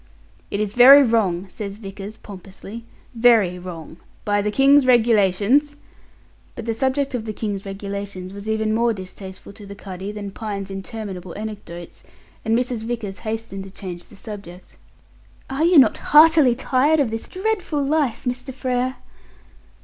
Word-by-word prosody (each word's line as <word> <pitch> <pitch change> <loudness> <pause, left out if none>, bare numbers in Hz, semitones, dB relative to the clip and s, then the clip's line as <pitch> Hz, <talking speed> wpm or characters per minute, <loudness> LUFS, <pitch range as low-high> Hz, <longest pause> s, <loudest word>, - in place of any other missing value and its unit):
"It 200 - -3
is 210 -1 -1
very 270 +4 +9
wrong," 200 -7 +1
says 200 +1 -7
Vickers, 200 0 -8
pompously. 200 +3 -11 0.3
"Very 225 -7 +4
wrong. 170 -3 -9 0.3
By 205 0 +1
the 210 - -1
King's 275 +4 +5
Regulations 235 +4 +3 0.4
" - - -33
But 230 - -7
the 230 - -1
subject 265 +4 -1
of 235 -3 -3
the 215 - -4
King's 200 -2 -4
Regulations 195 -1 -6
was 200 +2 -7
even 220 0 0
more 235 +1 +2
distasteful 190 0 -10
to 205 - -13
the 200 - -9
cuddy 195 0 -7
than 205 -1 -6
Pine's 200 -2 -5
interminable 195 -3 -7
anecdotes, 205 -5 -8 0.4
and 225 +1 +2
Mrs. 245 -1 -1
Vickers 225 -5 -4
hastened 220 -3 -5
to - - -10
change 185 -3 -8
the - - -17
subject. 195 -4 -10 0.8
"Are 285 +4 +1
you 345 -1 +5
not 255 -6 +6
heartily 305 -4 +6
tired 275 +5 +2
of 265 -6 +1
this 225 0 -5
dreadful 375 -7 -1
life, 285 -3 0
Mr. 250 +2 -3
Frere?" 255 -1 -1
215 Hz, 155 wpm, -22 LUFS, 195-250 Hz, 0.8 s, very